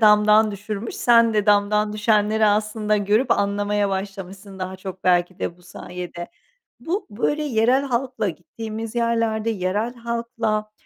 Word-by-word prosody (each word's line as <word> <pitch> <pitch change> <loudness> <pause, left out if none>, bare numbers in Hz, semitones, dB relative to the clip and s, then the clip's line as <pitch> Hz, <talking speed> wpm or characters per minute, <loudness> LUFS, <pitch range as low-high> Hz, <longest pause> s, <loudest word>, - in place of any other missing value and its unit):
damdan 210 0 +5
düşürmüş, 205 +2 -5
sen 230 -2 +4
de 210 -1 +1
damdan 210 +1 +3
düşenleri 215 0 +2
aslında 215 0 +1
görüp 210 +5 +1
anlamaya 205 0 +1
başlamışsın 195 0 -6
daha 185 0 -5
çok 190 0 -9
belki 180 +1 +2
de 170 - -3
bu 180 - -23
sayede. 180 -1 -8 0.5
Bu, 365 +6 -3
böyle, 270 +8 -1
yerel 255 0 +2
halkla 245 -4 -1
gittiğimiz 220 +6 -7
yerlerde 230 -2 0
yerel 210 +4 -1
halkla, 230 -2 -2
210 Hz, 135 wpm, -22 LUFS, 200-230 Hz, 0.5 s, damdan